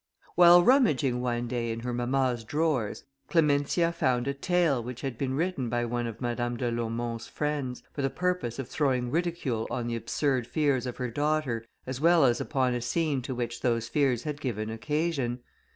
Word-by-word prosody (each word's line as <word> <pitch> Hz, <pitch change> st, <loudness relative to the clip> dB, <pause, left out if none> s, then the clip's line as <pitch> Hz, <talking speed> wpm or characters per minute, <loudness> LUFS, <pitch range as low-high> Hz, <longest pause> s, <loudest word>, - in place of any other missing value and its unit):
While 175 Hz, 0 st, +8 dB
rummaging 150 Hz, -, +3 dB
one 120 Hz, -1 st, -1 dB
day 120 Hz, -1 st, -2 dB
in 115 Hz, 0 st, -4 dB
her 125 Hz, +1 st, -3 dB
mamma's 120 Hz, 0 st, 0 dB
drawers, 145 Hz, -3 st, -1 dB, 0.2 s
Clementia 160 Hz, +1 st, +2 dB
found 125 Hz, -6 st, 0 dB
a 140 Hz, -, 0 dB
tale, 160 Hz, -2 st, +1 dB
which 125 Hz, +1 st, -7 dB
had 135 Hz, -3 st, -3 dB
been 130 Hz, +2 st, -2 dB
written 155 Hz, -6 st, -1 dB
by 120 Hz, 0 st, 0 dB
one 120 Hz, 0 st, -2 dB
of 115 Hz, -1 st, -7 dB
Madame 120 Hz, -1 st, -2 dB
de 120 Hz, 0 st, -1 dB
Laumont's 115 Hz, 0 st, -3 dB
friends, 145 Hz, -4 st, -3 dB
for 145 Hz, -, -3 dB
the 135 Hz, -, +1 dB
purpose 180 Hz, -5 st, -1 dB
of 135 Hz, -3 st, -4 dB
throwing 130 Hz, -5 st, 0 dB
ridicule 160 Hz, -9 st, -1 dB
on 120 Hz, -, -2 dB
the 120 Hz, 0 st, -2 dB
absurd 130 Hz, +1 st, -1 dB
fears 140 Hz, -5 st, +1 dB
of 125 Hz, -, -5 dB
her 125 Hz, -2 st, -3 dB
daughter, 145 Hz, -4 st, 0 dB, 0.2 s
as 130 Hz, +1 st, -5 dB
well 165 Hz, -2 st, +5 dB
as 120 Hz, -2 st, +2 dB
upon 130 Hz, -4 st, 0 dB
a 120 Hz, -, -2 dB
scene 150 Hz, +1 st, 0 dB
to 130 Hz, +1 st, -5 dB
which 120 Hz, -1 st, -4 dB
those 115 Hz, -2 st, 0 dB
fears 130 Hz, -4 st, +1 dB
had 150 Hz, -1 st, -4 dB
given 110 Hz, -5 st, -3 dB
occasion. 130 Hz, +1 st, -1 dB
130 Hz, 185 wpm, -28 LUFS, 120-150 Hz, 0.2 s, While